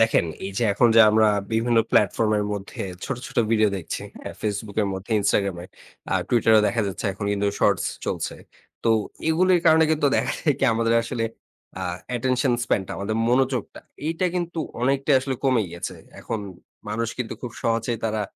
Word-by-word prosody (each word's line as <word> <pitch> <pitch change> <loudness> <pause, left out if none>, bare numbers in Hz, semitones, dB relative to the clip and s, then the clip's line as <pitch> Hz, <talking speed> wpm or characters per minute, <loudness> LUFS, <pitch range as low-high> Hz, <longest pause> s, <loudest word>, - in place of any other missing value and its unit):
দেখেন, 115 -6 +3 0.2
এই 100 - -6
যে 120 - +1
এখন 120 +4 +4
যে - - +10
আমরা 110 0 +4 0.2
বিভিন্ন 115 +1 +2
প্ল্যাটফর্ম 105 +2 +3
এর 105 - 0
মধ্যে 100 -1 -5 0.2
ছোট, 135 - -3
ছোট, - - -12
ভিডিও 110 -2 +4
দেখছি। 90 - -5 0.2
হ্যাঁ? - - -7
Facebook 105 -1 -3
এর 100 - 0
মধ্যে 95 +4 -8
Instagram 100 -2 +1
এ - - -10 0.5
আ - - +2
Twitter 115 -2 +3
এও 105 - +5
দেখা 115 -1 0
যাচ্ছে 95 - -5
এখন 100 - -6
কিন্তু 100 0 0
শর্টস 100 -4 +3 0.2
চলছে। - - -3 0.5
তো 115 - +4 0.4
এগুলির 180 +2 +3
কারণে 160 0 +6
কিন্তু 150 -2 +2
দেখা - - 0
যায় 150 -3 +2
কি - - +1
আমাদের 115 0 +1
আসলে 115 -1 -3 0.6
আ - - -3 0.3
অ্যাটেনশন 125 +1 +1
স্প্যান 115 - +1
টা - - -6
আমাদের 110 +3 -2
মনোযোগটা 130 -1 0 0.3
এইটা 165 +3 0
কিন্তু 175 -2 -2 0.2
অনেকটাই 135 +2 +2
আসলে 130 0 -2
কমে 130 -4 +3
গিয়েছে। 85 0 -6 0.2
এখন 115 - -3 0.5
মানুষ 115 +2 -1
কিন্তু 125 -3 -3
খুব 125 - -4
সহজেই 115 0 0
তারা 110 -1 0
115 Hz, 185 wpm, -24 LUFS, 105-130 Hz, 0.6 s, যে